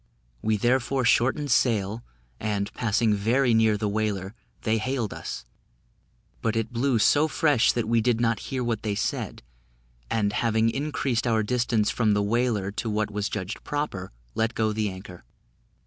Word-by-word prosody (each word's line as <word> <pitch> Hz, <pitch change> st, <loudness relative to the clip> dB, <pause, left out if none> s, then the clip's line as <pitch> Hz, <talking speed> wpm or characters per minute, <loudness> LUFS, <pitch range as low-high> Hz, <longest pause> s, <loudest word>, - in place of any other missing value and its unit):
We 110 Hz, -1 st, +1 dB
therefore 125 Hz, +3 st, +1 dB
shortened 130 Hz, +4 st, +2 dB
sail, 110 Hz, -2 st, +1 dB, 0.4 s
and, 100 Hz, -1 st, -2 dB
passing 115 Hz, -1 st, +1 dB
very 115 Hz, +5 st, +2 dB
near 110 Hz, -1 st, +4 dB
the 105 Hz, 0 st, -1 dB
whaler, 100 Hz, -2 st, -2 dB, 0.3 s
they 110 Hz, 0 st, +1 dB
hailed 125 Hz, -2 st, -2 dB
us; 65 Hz, -, -6 dB, 1.0 s
but 115 Hz, 0 st, 0 dB
it 115 Hz, +2 st, -2 dB
blew 125 Hz, +1 st, +2 dB
so 145 Hz, +7 st, +4 dB
fresh 150 Hz, -6 st, +3 dB
that 120 Hz, -3 st, -1 dB
we 115 Hz, 0 st, +3 dB
did 120 Hz, 0 st, +1 dB
not 115 Hz, -2 st, +1 dB
hear 130 Hz, -2 st, -2 dB
what 115 Hz, -2 st, -1 dB
they 105 Hz, -2 st, -2 dB
said; 105 Hz, -, -3 dB, 0.7 s
and, 105 Hz, -2 st, 0 dB
having 115 Hz, 0 st, +2 dB
increased 135 Hz, -4 st, -1 dB
our 110 Hz, -2 st, +2 dB
distance 115 Hz, -1 st, +1 dB
from 110 Hz, -3 st, +2 dB
the 105 Hz, -, +1 dB
whaler 110 Hz, -2 st, 0 dB
to 110 Hz, +2 st, -3 dB
what 105 Hz, 0 st, -1 dB
was 105 Hz, 0 st, -2 dB
judged 95 Hz, +3 st, -5 dB
proper, 145 Hz, -11 st, -3 dB, 0.2 s
let 115 Hz, +1 st, 0 dB
go 110 Hz, -1 st, +1 dB
the 105 Hz, -1 st, 0 dB
anchor. 95 Hz, -1 st, -10 dB
110 Hz, 165 wpm, -26 LUFS, 105-120 Hz, 1.0 s, near